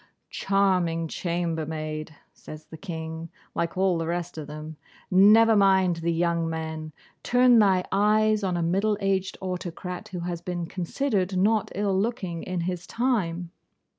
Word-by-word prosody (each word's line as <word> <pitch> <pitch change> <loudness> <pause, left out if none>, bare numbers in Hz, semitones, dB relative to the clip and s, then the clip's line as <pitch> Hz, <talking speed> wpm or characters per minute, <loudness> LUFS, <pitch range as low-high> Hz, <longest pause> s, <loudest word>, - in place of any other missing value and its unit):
'Charming 180 -4 +1
chambermaid,' 160 -3 -3 0.2
says 155 0 -11
the - - -11
King 160 -1 -6 0.2
(like 170 +1 -2
all 185 -2 +2
the 165 - -2
rest 175 +1 -3
of 155 -3 -6
them), 155 +1 -8 0.4
'never 215 +4 +6
mind 190 -3 +4
the 170 0 -1
young 170 0 0
men! 160 -1 -5 0.3
Turn 245 -1 +5
thy 190 -3 +3
eyes 215 +1 +3
on 185 -2 0
a 170 - 0
middle 200 +5 +1
aged 195 -1 -1
autocrat, 180 -1 -5
who 180 -2 -6
has 170 -1 -4
been 175 -1 -4
considered 185 +2 -1
not 210 +2 +2
ill 200 0 0
looking 190 -5 -2
in 185 -2 -3
his 180 0 -4
time. 180 -9 -1
180 Hz, 145 wpm, -26 LUFS, 165-195 Hz, 0.4 s, never